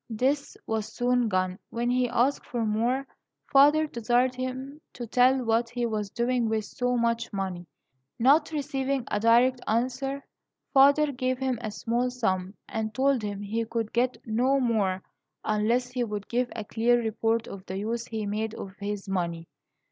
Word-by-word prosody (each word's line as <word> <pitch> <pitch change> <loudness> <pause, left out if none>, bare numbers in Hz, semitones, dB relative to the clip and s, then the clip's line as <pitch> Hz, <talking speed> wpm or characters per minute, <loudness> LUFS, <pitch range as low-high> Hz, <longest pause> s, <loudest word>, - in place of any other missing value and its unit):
This 265 +6 -1
was 220 -1 -2
soon 245 -1 +1
gone. 185 -1 0
When 240 +1 -1
he 250 -1 +2
asked 260 +5 +1
for 235 -2 -2
more, 235 +5 0 0.5
father 295 +3 +6
desired 245 -1 +1
him 260 +3 -5
to 240 - -6
tell 250 +2 +3
what 230 +1 +2
he 245 0 -2
was 215 -3 -2
doing 240 +1 0
with 220 -1 -1
so 245 +3 -1
much 235 0 0
money. 190 -4 -4 0.5
Not 290 +6 +4
receiving 275 -3 -1
a 210 - +1
direct 240 +3 +4
answer, 260 +4 -1 0.5
father 285 +2 +6
gave 255 -1 -1
him 260 -3 -1
a 220 - -3
small 235 +4 -1
sum, 190 -6 -1
and 220 -2 -3
told 270 -2 +2
him 205 -1 -4
he 220 +3 -1
could 225 -1 -3
get 250 +2 +1
no 255 +5 +2
more 205 -7 +1 0.4
unless 230 +4 +1
he 250 -1 -1
would 210 -3 -4
give 245 +1 0
a 220 -2 -5
clear 235 +3 +2
report 225 0 0
of 195 -1 -8
the 190 - -4
use 230 +3 -3
he 220 -2 -3
made 215 +2 -2
of 190 - -7
his 205 0 -4
money. 170 -3 -2
235 Hz, 170 wpm, -27 LUFS, 215-255 Hz, 0.5 s, father